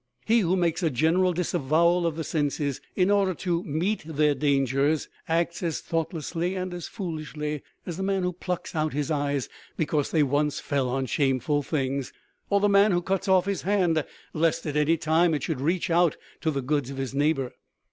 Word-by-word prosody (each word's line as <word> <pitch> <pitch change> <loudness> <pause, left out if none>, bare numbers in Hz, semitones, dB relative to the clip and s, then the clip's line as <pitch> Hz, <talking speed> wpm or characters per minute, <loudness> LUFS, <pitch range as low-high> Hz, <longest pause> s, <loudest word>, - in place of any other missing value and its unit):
He 230 +1 +4
who 185 -3 +2
makes 175 -1 +1
a 165 - +2
general 160 +7 +2
disavowal 170 0 +2
of 165 - -2
the 160 - -3
senses 145 -3 -1
in 185 +2 +3
order 195 -3 +2
to 175 0 -1
meet 170 +8 -1
their 150 -1 +2
dangers 140 +1 +1 0.2
acts 170 +1 0
as 170 -3 -1
thought 165 -1 -2
lessly 170 +3 -3
and 185 -1 -4
as 175 -2 -5
foolishly 155 - -4 0.2
as 175 -2 -5
the - - -4
man 195 -1 0
who 180 0 0
plucks 180 0 -4
out 155 -1 -1
his 150 +2 -1
eyes 145 -3 0 0.3
because 150 -2 0
they 155 -3 +3
once 145 +2 +1
fell 135 -3 -1
on 135 +1 -1
shameful 135 +2 +1
things, 140 -2 -2 0.4
or 200 - +3
the 205 - +3
man 200 +1 +5
who 175 0 +1
cuts 195 +2 -1
off 185 -1 +4
his 200 -1 -1
hand 180 -6 +2 0.3
lest 160 0 +1
at 150 -2 -3
any 150 +2 +3
time 160 +1 +3
it 145 - -3
should 145 -4 -2
reach 170 +4 0
out 170 -2 +3 0.2
to 160 - 0
the 140 -3 -2
goods 145 -1 0
of 135 - -7
his 135 -1 -3
neighbor." 140 -2 +1
160 Hz, 200 wpm, -26 LUFS, 145-180 Hz, 0.4 s, man